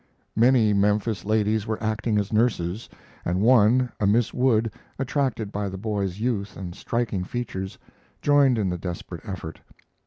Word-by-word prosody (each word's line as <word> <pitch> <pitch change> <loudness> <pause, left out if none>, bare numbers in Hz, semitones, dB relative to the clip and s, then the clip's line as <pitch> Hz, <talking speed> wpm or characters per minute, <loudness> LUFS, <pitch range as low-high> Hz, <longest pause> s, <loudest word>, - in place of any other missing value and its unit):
Many 115 -2 +4
Memphis 105 0 +1
ladies 110 0 +1
were 110 0 -1
acting 110 0 0
as 105 +1 -1
nurses, 105 -3 0 0.3
and 90 +2 0
one, 120 +2 +4
a 100 - +2
Miss 115 +3 +2
Wood, 115 -3 +2 0.3
attracted 130 -6 -1
by 100 -1 -2
the 95 - -6
boy's 100 -2 -2
youth 105 -4 -2
and 90 -2 -6
striking 110 -3 -2
features, 95 -3 -5 0.4
joined 140 -4 +4
in 100 -4 0
the 90 - -3
desperate 85 -1 -6
effort. 85 -5 -6
105 Hz, 150 wpm, -25 LUFS, 100-120 Hz, 0.4 s, Many